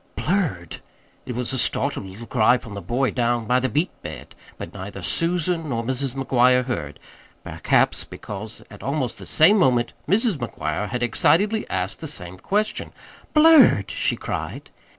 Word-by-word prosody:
"Blurred?" 150 Hz, -, -2 dB, 0.5 s
It 125 Hz, -, -4 dB
was 125 Hz, +1 st, -2 dB
a 130 Hz, -, 0 dB
startled 140 Hz, -7 st, +1 dB
little 100 Hz, +5 st, -10 dB
cry 115 Hz, +2 st, +3 dB
from 115 Hz, -4 st, -11 dB
the 100 Hz, -, -6 dB
boy 125 Hz, +4 st, 0 dB
down 120 Hz, -2 st, 0 dB
by 125 Hz, +3 st, +2 dB
the 130 Hz, 0 st, -1 dB
beet 155 Hz, +6 st, 0 dB
bed; -, -, -9 dB, 0.2 s
but -, -, -8 dB
neither -, -, -8 dB
Susan 170 Hz, -1 st, 0 dB
nor 115 Hz, -3 st, -2 dB
Mrs. 130 Hz, +1 st, -2 dB
McGuire 125 Hz, -1 st, +3 dB
heard 80 Hz, -, -5 dB, 0.4 s
perhaps -, -, +1 dB
because 105 Hz, +2 st, -8 dB
at 100 Hz, -, -12 dB
almost 135 Hz, -3 st, -2 dB
the -, -, -9 dB
same 190 Hz, +7 st, +5 dB
moment 125 Hz, -6 st, +2 dB, 0.2 s
Mrs. 210 Hz, -2 st, +3 dB
McGuire 105 Hz, -, -4 dB
had 125 Hz, +2 st, -2 dB
excitedly 205 Hz, -, +2 dB
asked -, -, -3 dB
the 160 Hz, -, -6 dB
same 95 Hz, -, -6 dB
question. 210 Hz, -, -2 dB, 0.4 s
"Blurred?" 315 Hz, -1 st, +6 dB
she -, -, 0 dB
cried. -, -, -6 dB
125 Hz, 160 wpm, -22 LUFS, 115-165 Hz, 0.5 s, Blurred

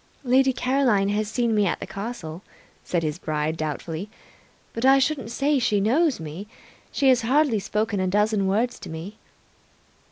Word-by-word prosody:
"Lady 265 Hz, +1 st, +4 dB
Caroline 250 Hz, -6 st, +1 dB
has 210 Hz, +1 st, -1 dB
seen 235 Hz, 0 st, 0 dB
me 210 Hz, -2 st, +3 dB
at -, -, -1 dB
the -, -, -5 dB
castle," 195 Hz, -6 st, -6 dB, 0.4 s
said 175 Hz, -2 st, -1 dB
his 155 Hz, +2 st, -2 dB
bride 155 Hz, -1 st, -2 dB
doubtfully, 160 Hz, +4 st, -4 dB, 0.6 s
"but 230 Hz, -, -4 dB
I 270 Hz, +1 st, +6 dB
shouldn't 270 Hz, -4 st, 0 dB
say 275 Hz, +4 st, +1 dB
she 225 Hz, -4 st, +1 dB
knows 265 Hz, -, +2 dB
me. 160 Hz, +6 st, -7 dB, 0.4 s
She 275 Hz, -, +2 dB
has 255 Hz, -1 st, +4 dB
hardly 260 Hz, -1 st, +2 dB
spoken 210 Hz, +1 st, -1 dB
a 185 Hz, -, 0 dB
dozen 210 Hz, +1 st, +1 dB
words 225 Hz, +6 st, 0 dB
to -, -, -9 dB
me." 165 Hz, +7 st, -8 dB
215 Hz, 165 wpm, -24 LUFS, 185-255 Hz, 0.6 s, I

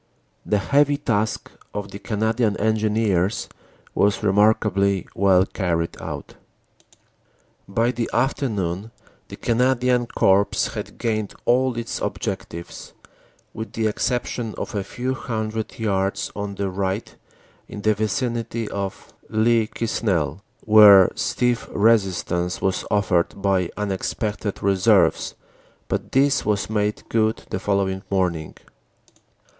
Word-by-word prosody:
The 105 Hz, -, +1 dB
heavy 145 Hz, +7 st, +2 dB
task 110 Hz, -6 st, -1 dB, 0.2 s
of 100 Hz, -1 st, -4 dB
the 100 Hz, -, -8 dB
Canadian 110 Hz, 0 st, 0 dB
Engineers 110 Hz, -3 st, +1 dB, 0.5 s
was 100 Hz, +1 st, +2 dB
remarkably 100 Hz, -1 st, +2 dB
well 95 Hz, -1 st, +4 dB
carried 85 Hz, -5 st, -2 dB
out. -, -, -6 dB, 1.3 s
"By 115 Hz, +4 st, +1 dB
the 120 Hz, -2 st, -3 dB
afternoon 105 Hz, -8 st, -1 dB, 0.4 s
the -, -, -9 dB
Canadian 125 Hz, 0 st, +1 dB
Corps 100 Hz, -3 st, +3 dB, 0.3 s
had -, -, -6 dB
gained 110 Hz, -3 st, -2 dB
all 125 Hz, 0 st, +2 dB
its 115 Hz, -1 st, -4 dB
objectives, 85 Hz, +1 st, -5 dB, 0.6 s
with 110 Hz, 0 st, -7 dB
the 110 Hz, -, -1 dB
exception 120 Hz, 0 st, -1 dB
of -, -, -5 dB
a 100 Hz, -2 st, -1 dB
few 125 Hz, +6 st, -3 dB
hundred 110 Hz, -3 st, -4 dB
yards 100 Hz, -3 st, -1 dB
on 100 Hz, -1 st, -4 dB
the 100 Hz, -1 st, -2 dB
right 95 Hz, +2 st, -3 dB, 0.5 s
in 105 Hz, -, -8 dB
the 110 Hz, -, +4 dB
vicinity 115 Hz, +1 st, -2 dB
of 100 Hz, -1 st, -5 dB, 0.2 s
Le 110 Hz, 0 st, +2 dB
Quesnel, 95 Hz, -9 st, -1 dB, 0.2 s
where 105 Hz, -3 st, +8 dB
stiff 125 Hz, -1 st, -1 dB
resistance 95 Hz, -5 st, +1 dB
was 95 Hz, -1 st, -1 dB
offered 100 Hz, -3 st, +1 dB
by 95 Hz, -3 st, +1 dB
unexpected 105 Hz, +1 st, -3 dB
reserves, 100 Hz, +1 st, +3 dB, 0.5 s
but -, -, -3 dB
this 135 Hz, +1 st, +3 dB
was 105 Hz, 0 st, -1 dB
made 105 Hz, -1 st, -1 dB
good 110 Hz, -1 st, 0 dB
the 95 Hz, -, -1 dB
following 95 Hz, -1 st, 0 dB
morning. 90 Hz, -5 st, -1 dB
105 Hz, 115 wpm, -22 LUFS, 95-115 Hz, 1.3 s, where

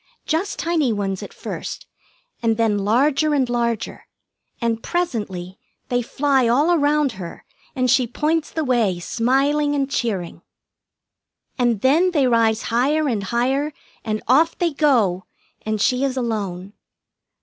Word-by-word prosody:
Just 330 Hz, +5 st, -1 dB
tiny 325 Hz, -7 st, +1 dB
ones 195 Hz, -3 st, -2 dB
at -, -, -8 dB
first, -, -, -6 dB, 0.6 s
and 225 Hz, -1 st, +1 dB
then 220 Hz, -3 st, +2 dB
larger 275 Hz, +9 st, +2 dB
and 265 Hz, -3 st, +2 dB
larger, 235 Hz, -2 st, -2 dB, 0.5 s
and 230 Hz, -2 st, -1 dB
presently 205 Hz, -, -3 dB, 0.3 s
they 245 Hz, 0 st, +1 dB
fly 265 Hz, +1 st, +1 dB
all 285 Hz, +9 st, +3 dB
around 295 Hz, -3 st, +2 dB
her, 185 Hz, -5 st, -9 dB, 0.3 s
and 255 Hz, -1 st, +1 dB
she 250 Hz, 0 st, +3 dB
points 305 Hz, +6 st, -1 dB
the 320 Hz, -, -2 dB
way, 235 Hz, -9 st, +1 dB
smiling 275 Hz, -, +1 dB
and 275 Hz, -1 st, -1 dB
cheering. 200 Hz, -11 st, -2 dB, 1.2 s
And 240 Hz, -4 st, +1 dB
then 315 Hz, +8 st, +4 dB
they 290 Hz, -5 st, +3 dB
rise 230 Hz, -2 st, +2 dB
higher 290 Hz, +6 st, +2 dB
and 215 Hz, -7 st, -1 dB
higher, 265 Hz, +7 st, 0 dB, 0.3 s
and 215 Hz, -1 st, -3 dB
off 310 Hz, +7 st, +3 dB
they 340 Hz, -3 st, 0 dB
go, 230 Hz, -, +2 dB, 0.4 s
and 215 Hz, -1 st, -1 dB
she 250 Hz, +5 st, +2 dB
is 270 Hz, -1 st, -1 dB
alone. 200 Hz, -6 st, -3 dB
250 Hz, 140 wpm, -21 LUFS, 220-290 Hz, 1.2 s, then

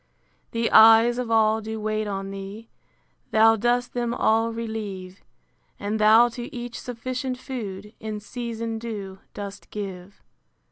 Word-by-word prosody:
The 230 Hz, 0 st, -1 dB
eyes 225 Hz, +2 st, +7 dB
of 245 Hz, -2 st, -3 dB
all 220 Hz, -1 st, +3 dB
do 220 Hz, 0 st, -5 dB
wait 215 Hz, 0 st, -1 dB
on 195 Hz, -1 st, -4 dB
thee; 195 Hz, +3 st, -8 dB, 0.6 s
Thou 225 Hz, +1 st, +6 dB
dost 240 Hz, +3 st, 0 dB
them 240 Hz, -1 st, -1 dB
all 225 Hz, 0 st, +2 dB
relieve: 210 Hz, -5 st, -6 dB, 0.6 s
And 210 Hz, +2 st, -2 dB
thou 220 Hz, +3 st, +7 dB
to 240 Hz, +1 st, -7 dB
each 240 Hz, -1 st, -6 dB
sufficient 255 Hz, +1 st, -4 dB
food, 210 Hz, -6 st, -6 dB
In 215 Hz, -1 st, -5 dB
season 230 Hz, 0 st, -5 dB
due, 205 Hz, -4 st, -6 dB, 0.2 s
dost 200 Hz, -1 st, -7 dB
give. 195 Hz, -2 st, -7 dB
220 Hz, 135 wpm, -25 LUFS, 205-235 Hz, 0.6 s, eyes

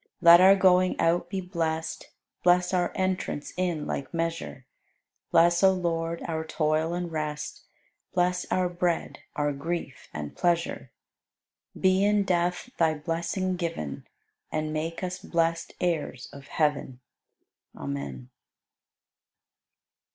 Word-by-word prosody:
Let 170 Hz, 0 st, +9 dB
our 190 Hz, +1 st, +8 dB
going 185 Hz, -1 st, +4 dB
out 170 Hz, +1 st, +2 dB
be 190 Hz, 0 st, -2 dB
blest, 165 Hz, -3 st, -3 dB, 0.3 s
Bless 180 Hz, +1 st, +4 dB
our 175 Hz, -1 st, +1 dB
entrance 185 Hz, -6 st, -2 dB
in 175 Hz, -4 st, -1 dB
like 140 Hz, -, -4 dB
measure; 165 Hz, -5 st, -3 dB, 0.6 s
Bless, 170 Hz, +1 st, +4 dB
O 190 Hz, -1 st, +7 dB
Lord, 170 Hz, -2 st, -2 dB
our 160 Hz, -1 st, -2 dB
toil 160 Hz, +1 st, 0 dB
and 175 Hz, -1 st, -3 dB
rest, 150 Hz, -1 st, -4 dB, 0.5 s
Bless 180 Hz, 0 st, +1 dB
our 185 Hz, -1 st, +2 dB
bread, 175 Hz, -1 st, -1 dB, 0.2 s
our 145 Hz, 0 st, 0 dB
grief 150 Hz, -1 st, -5 dB
and 75 Hz, -1 st, -6 dB
pleasure; 170 Hz, -1 st, 0 dB, 0.9 s
Be 190 Hz, 0 st, +4 dB
in 205 Hz, 0 st, +3 dB
death 180 Hz, +5 st, 0 dB
Thy 160 Hz, -2 st, +3 dB
blessing 170 Hz, +4 st, -2 dB
given, 165 Hz, -, -4 dB, 0.4 s
And 155 Hz, 0 st, -2 dB
make 165 Hz, +3 st, -3 dB
us 180 Hz, +1 st, -3 dB
blest 165 Hz, -3 st, -1 dB
heirs 160 Hz, -7 st, -2 dB
of 140 Hz, -1 st, -11 dB
heaven. 145 Hz, -5 st, -1 dB, 0.8 s
Amen. 70 Hz, -3 st, -5 dB
170 Hz, 120 wpm, -27 LUFS, 155-180 Hz, 0.9 s, Let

